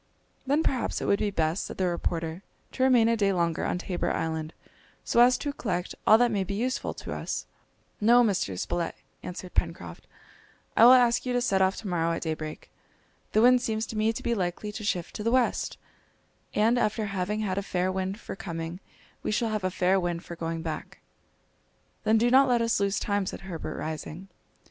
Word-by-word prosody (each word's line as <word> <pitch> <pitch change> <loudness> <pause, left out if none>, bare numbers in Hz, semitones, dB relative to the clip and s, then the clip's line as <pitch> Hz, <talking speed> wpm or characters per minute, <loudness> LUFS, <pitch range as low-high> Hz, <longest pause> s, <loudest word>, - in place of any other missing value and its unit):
"Then 290 +4 +2
perhaps 255 -6 -1
it - - -4
would 200 - +2
be 210 - +1
best," 165 -2 0
said - - -8
the 190 - +1
reporter, 170 -1 -2 0.3
"to - - -6
remain 250 -3 +5
a 230 - +3
day 200 -3 +2
longer 170 -3 0
on - - -1
Tabor 175 -1 -2
Island, 160 -1 -2 0.5
so - - +1
as 250 +1 +6
to 290 -1 -3
collect 180 -9 -3
all 220 - +8
that 240 0 +3
may 200 -3 0
be 195 +1 -4
useful 250 +5 -2
to - - -6
us." - - -4 0.5
"No, 240 +3 +6
Mr. 185 - 0
Spilett," 170 - -2 0.3
answered 180 0 -7
Pencroft, 90 - -3 0.7
"I 230 - +7
will 250 - +10
ask 240 -2 +4
you 250 - -2
to 245 - +2
set 195 -6 +2
off 190 0 +3
to 220 - -7
morrow 170 -2 0
at - - -3
daybreak. 155 -1 -5 0.6
The 215 - +4
wind 250 0 +6
seems 220 -2 -1
to - - -8
me 215 +1 +2
to 225 - -7
be 235 - +1
likely 190 +1 -2
to 215 +1 -7
shift 180 -4 -2
to 210 - -5
the 230 - +1
west, 250 0 +1 0.8
and 225 +4 +3
after 215 0 0
having 200 +2 -2
had 195 -2 -1
a - - -2
fair 185 -1 -1
wind 190 +2 -3
for - - -7
coming 165 -1 -5 0.4
we - - -3
shall 220 +2 0
have 215 -2 -2
a 185 - +1
fair 185 +1 +2
wind 175 -1 -3
for 170 - -7
going 165 0 -4
back." 160 -2 -5 1.1
"Then 220 +1 +4
do 240 +2 +3
not 270 +1 +6
let 240 -1 +3
us 230 -2 +1
lose 200 0 +1
time," 200 -2 -1
said - - -5
Herbert, 165 -5 -6
rising. 160 +4 -6
195 Hz, 205 wpm, -27 LUFS, 175-230 Hz, 1.1 s, will